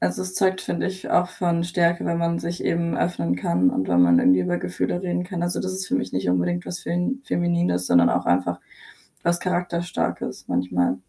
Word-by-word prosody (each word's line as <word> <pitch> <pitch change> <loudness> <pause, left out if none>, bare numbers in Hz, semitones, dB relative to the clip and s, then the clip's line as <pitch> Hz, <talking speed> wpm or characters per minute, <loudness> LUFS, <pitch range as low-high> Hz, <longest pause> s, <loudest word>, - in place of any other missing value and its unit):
also 90 - -1
es 185 0 -4
zeugt, 190 -2 +2
finde - - -2
ich, 190 0 -6
auch 180 +1 +3
von 175 -2 -1
Stärke, 170 0 +1
wenn 170 - 0
man 170 0 0
sich 170 +1 -4
eben 170 0 0
öffnen 90 - 0
kann 90 0 +2
und 95 - -2
wenn 90 0 +4
man 85 -1 +6
irgendwie 90 0 +5
über 90 -1 0
Gefühle 90 - -2
reden 180 -1 -1
kann. 180 -2 -4
Also, 175 0 -1
das 185 0 -2
ist 190 +3 -4
für 270 - 0
mich 255 - -3
nicht 95 -1 -1
unbedingt 90 -1 0
was 180 - -4
Fem 180 +10 -2
Feminines, 175 - 0
sondern 85 -1 +5
auch 90 - 0
einfach 90 0 +1 0.6
was 175 0 +2
Charakterstarkes 175 -1 -2
manchmal. 90 0 0
170 Hz, 205 wpm, -23 LUFS, -, 0.6 s, man